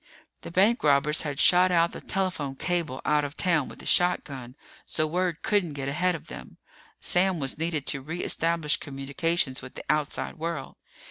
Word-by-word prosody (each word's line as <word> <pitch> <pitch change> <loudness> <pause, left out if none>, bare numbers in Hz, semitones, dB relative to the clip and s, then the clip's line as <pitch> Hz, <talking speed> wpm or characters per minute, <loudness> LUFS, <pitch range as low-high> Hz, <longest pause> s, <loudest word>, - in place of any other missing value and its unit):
The - - -8
bankrobbers 155 - +3
had 145 -3 -4
shot 180 +2 +5
out 170 -1 +3
the - - -8
telephone 170 -8 -2
cable 165 -4 -2
out 150 -1 +2
of 145 +1 -6
town 170 -7 +2
with - - -11
a - - -11
shotgun, 135 -8 0 0.3
so 155 - 0
word 175 +1 -2
couldn't 200 -7 +1
get 135 -1 -4
ahead 175 +6 +1
of 165 - -9
them. - - -10 0.4
Sam 180 -1 +2
was 135 +1 -1
needed 160 -3 -1
to 140 - +1
re 160 +6 -5
establish 165 -2 +2
communications 140 +1 -2
with 130 - -11
the - - -8
outside 150 +1 -2
world. 165 -4 -4
160 Hz, 175 wpm, -27 LUFS, 140-175 Hz, 0.4 s, shot